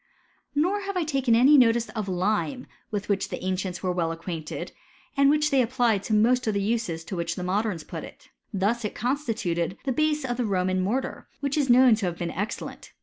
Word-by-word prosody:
Nor 360 +8 +2
have 395 -1 -3
I 355 - +1
taken 270 -6 +2
any 270 +5 +7
notice 235 -1 +4
of 215 -3 -4
lime 210 +8 -1 0.2
with 205 -2 -3
which 200 -1 0
the - - -5
ancients 185 0 -2
were 185 - +1
well 170 -2 0
acquainted, 165 -1 -5 0.4
and 280 0 +5
which 300 +1 +2
they 270 -2 +4
applied 240 -4 +1
to 220 - -1
most 240 +3 +3
of 215 - +1
the - - +2
uses 205 -7 -1
to 190 - -6
which 170 -1 -2
the 180 - -5
modems 190 -2 -1
put - - -6
it. - - -13 0.2
Thus 210 +4 0
it 210 - -3
constituted 215 - -1
the 270 - -1
base 300 +1 +1
of 245 -2 -2
the 245 - 0
Roman 185 -1 +1
mortar, 240 +8 -2
which 280 -1 -1
is 285 -4 +1
known 250 0 +7
to 200 -4 -1
have 170 -1 -3
been 170 -1 -3
excellent. 205 +6 -5
225 Hz, 210 wpm, -26 LUFS, 185-260 Hz, 0.4 s, any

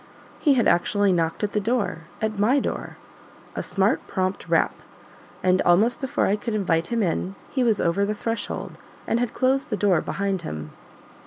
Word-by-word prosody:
He 290 -4 +4
had 240 - +3
actually 200 +3 +3
knocked 165 +2 -1
at 205 - 0
the 210 - +1
door 210 -6 -1 0.2
at 215 -2 -1
MY 245 +7 +4
door; - - -4 0.6
a - - -2
smart, 195 +2 0
prompt 185 0 -2
rap; - - +3 0.7
and, 185 0 +3
almost 215 +11 +3
before 265 - 0
I 205 - +2
could 220 +1 -3
invite 170 -5 +1
him 235 -2 0
in, 185 +2 -1 0.2
he 260 - +1
was 225 -4 +2
over 170 +4 +1
the 210 +1 0
threshold, 225 -1 -4 0.3
and 230 - +1
had 245 -1 -2
closed 265 +1 +1
the 210 - -1
door 195 -6 +3
behind 195 -2 -2
him. 75 - -6
205 Hz, 180 wpm, -24 LUFS, 185-230 Hz, 0.7 s, He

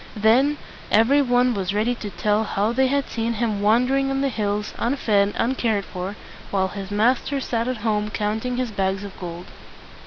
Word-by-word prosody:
Then 250 +8 +4 0.3
every 235 +7 +4
one 245 -1 +3
was 195 -1 -2
ready 220 +4 +1
to 220 -3 -6
tell 210 +4 0
how 210 0 0
they 265 +2 +3
had 280 +1 0
seen 230 0 -2
him 215 -2 -1
wan 220 +4 +4
der 270 +2 +1
ing 270 0 +1
on 270 0 0
the 275 - +1
hills, 210 -3 -2
unfed, 215 -5 +1
un 245 +3 +1
cared 220 -6 0
for, 185 +3 -5 0.3
while 190 -1 0
his 195 0 -7
master 245 +6 +1
sat 235 -3 -2
at 255 -1 -1
home 210 -1 0
counting 220 +4 -2
his 250 -3 -2
bags 195 0 -1
of 200 -1 -8
gold. 175 -1 -7
220 Hz, 195 wpm, -23 LUFS, 205-250 Hz, 0.3 s, Then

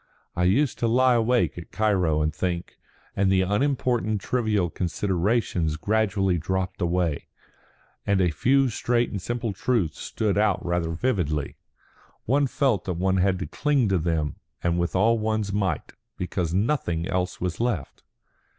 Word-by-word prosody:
I 90 - +1
used 125 +9 +2
to 115 - +1
lie 125 +2 +4
awake 120 -4 +1
at 85 - -11
Cairo 90 -8 +1
and 75 0 0
think; 85 +2 -3 0.4
and 95 -1 +2
the 95 -1 +3
unimportant 115 0 0
trivial 105 -6 0
considerations 90 -2 0
gradually 100 -2 +1
dropped 95 +3 -2
away; 85 -3 0 0.8
and 100 -2 +1
a 90 -3 +3
few 135 - +3
straight 120 +1 0
and 100 - -4
simple 120 0 -3
truths 95 -5 -1
stood 105 -2 -1
out 105 -3 +1
rather 85 -1 0
vividly. 80 - -1 0.7
One 140 +4 +2
felt 125 -7 0
that 90 - -1
one 95 +2 +1
had 95 0 +2
to 90 - -4
cling 140 -7 +1
to 95 -2 +2
them 80 -2 -1 0.3
and 85 0 +1
with 85 +2 -1
all 115 +4 +3
one's 110 -2 -1
might, 100 -2 -1 0.2
because 90 -2 -2
nothing 90 - 0
else 90 -1 -2
was 90 -1 -3
left." 115 - -2
95 Hz, 150 wpm, -25 LUFS, 85-115 Hz, 0.8 s, lie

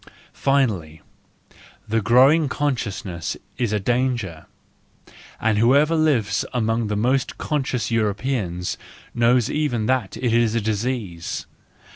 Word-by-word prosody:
Finally, 105 - 0 0.9
the 115 +1 +1
growing 135 +8 +5
consciousness 105 - -3 0.2
is 120 -4 0
a 105 - +1
danger, 120 -6 -1 0.9
and 110 -2 +1
whoever 140 +8 +4
lives 150 -9 +2
among 115 -1 0
the 105 - -2
most 125 +5 0
conscious 135 -5 -2
Europeans 105 -4 -1 0.3
knows 120 0 +3
even 140 -8 -1
that 125 -5 0
it 120 -3 0
is 115 -1 +2
a - - +2
disease. 105 -5 -3
115 Hz, 110 wpm, -22 LUFS, 105-130 Hz, 0.9 s, growing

